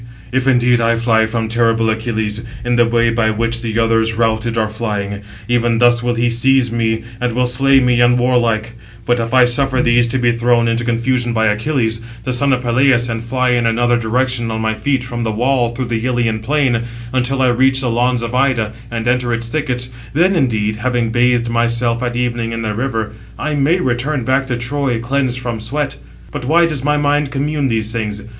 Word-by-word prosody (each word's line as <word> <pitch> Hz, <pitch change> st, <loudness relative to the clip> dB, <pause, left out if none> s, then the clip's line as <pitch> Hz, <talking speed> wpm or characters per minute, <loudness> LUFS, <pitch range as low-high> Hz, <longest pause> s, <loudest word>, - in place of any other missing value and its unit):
if 130 Hz, +1 st, 0 dB
indeed 125 Hz, -2 st, +3 dB
I 115 Hz, 0 st, +2 dB
fly 115 Hz, -1 st, +2 dB
from 110 Hz, 0 st, -2 dB
terrible 115 Hz, 0 st, +1 dB
Achilles, 110 Hz, -1 st, -2 dB, 0.2 s
in 120 Hz, 0 st, +1 dB
the 120 Hz, -1 st, +3 dB
way 115 Hz, 0 st, +2 dB
by 115 Hz, -1 st, +1 dB
which 115 Hz, +1 st, -1 dB
the 115 Hz, -2 st, -3 dB
others, 115 Hz, 0 st, +1 dB
routed, 115 Hz, 0 st, 0 dB
are 110 Hz, -1 st, +1 dB
flying, 105 Hz, -2 st, -4 dB, 0.3 s
even 120 Hz, -1 st, +1 dB
thus 120 Hz, 0 st, +4 dB
will 120 Hz, 0 st, -1 dB
he 120 Hz, +1 st, +1 dB
seize 125 Hz, +1 st, +2 dB
me, 115 Hz, -1 st, -1 dB, 0.2 s
and 125 Hz, -1 st, -1 dB
will 125 Hz, +1 st, +1 dB
slay 135 Hz, +2 st, +3 dB
me 125 Hz, -2 st, +2 dB
unwarlike; 120 Hz, -2 st, +2 dB, 0.3 s
but 120 Hz, 0 st, +1 dB
if 115 Hz, 0 st, -3 dB
I 130 Hz, -1 st, +5 dB
suffer 130 Hz, +1 st, +2 dB
these 120 Hz, -1 st, +3 dB
to 120 Hz, -, -1 dB
be 120 Hz, -1 st, +2 dB
thrown 120 Hz, 0 st, +2 dB
into 115 Hz, +1 st, 0 dB
confusion 120 Hz, +1 st, 0 dB
by 110 Hz, -1 st, +1 dB
Achilles, 110 Hz, +1 st, 0 dB, 0.2 s
the 130 Hz, -, -2 dB
son 140 Hz, +3 st, +1 dB
of 125 Hz, -1 st, 0 dB
Peleus, 120 Hz, 0 st, +2 dB
and 115 Hz, 0 st, -3 dB
fly 130 Hz, +2 st, 0 dB
in 120 Hz, -1 st, +2 dB
another 120 Hz, +1 st, +2 dB
direction 120 Hz, +1 st, -1 dB
on 110 Hz, 0 st, -3 dB
my 110 Hz, 0 st, 0 dB
feet 135 Hz, +3 st, -1 dB
from 120 Hz, -2 st, -5 dB
the 115 Hz, -1 st, -1 dB
wall 120 Hz, +1 st, +1 dB
through 120 Hz, +2 st, -4 dB
the 115 Hz, -1 st, -3 dB
Ilian 120 Hz, -3 st, 0 dB
plain, 130 Hz, -1 st, 0 dB, 0.3 s
until 130 Hz, +1 st, 0 dB
I 130 Hz, -, +4 dB
reach 130 Hz, +2 st, +3 dB
the 125 Hz, -3 st, 0 dB
lawns 120 Hz, +1 st, 0 dB
of 115 Hz, +1 st, -5 dB
Ida, 125 Hz, -5 st, +1 dB, 0.2 s
and 115 Hz, -1 st, -4 dB
enter 125 Hz, 0 st, +1 dB
its 115 Hz, 0 st, -2 dB
thickets; 125 Hz, -3 st, -1 dB, 0.2 s
then 180 Hz, +6 st, +2 dB
indeed, 110 Hz, -8 st, 0 dB
having 120 Hz, -1 st, -1 dB
bathed 120 Hz, 0 st, +2 dB
myself 115 Hz, 0 st, 0 dB
at 120 Hz, -1 st, -2 dB
evening 120 Hz, -2 st, -2 dB
in 115 Hz, 0 st, -4 dB
the 110 Hz, -1 st, -2 dB
river, 110 Hz, -2 st, -3 dB, 0.3 s
I 155 Hz, 0 st, -3 dB
may 145 Hz, +5 st, +2 dB
return 130 Hz, 0 st, -1 dB
back 130 Hz, +2 st, 0 dB
to 120 Hz, -2 st, -2 dB
Troy, 125 Hz, 0 st, -1 dB
cleansed 130 Hz, +1 st, -1 dB
from 120 Hz, -3 st, -4 dB
sweat. 135 Hz, +5 st, -3 dB, 0.3 s
But -, -, -6 dB
why 170 Hz, +5 st, +4 dB
does 150 Hz, -6 st, -3 dB
my 150 Hz, +1 st, +1 dB
mind 145 Hz, 0 st, +1 dB
commune 145 Hz, +1 st, -1 dB
these 110 Hz, -2 st, -1 dB
things? 105 Hz, -2 st, -4 dB
120 Hz, 205 wpm, -16 LUFS, 115-130 Hz, 0.3 s, I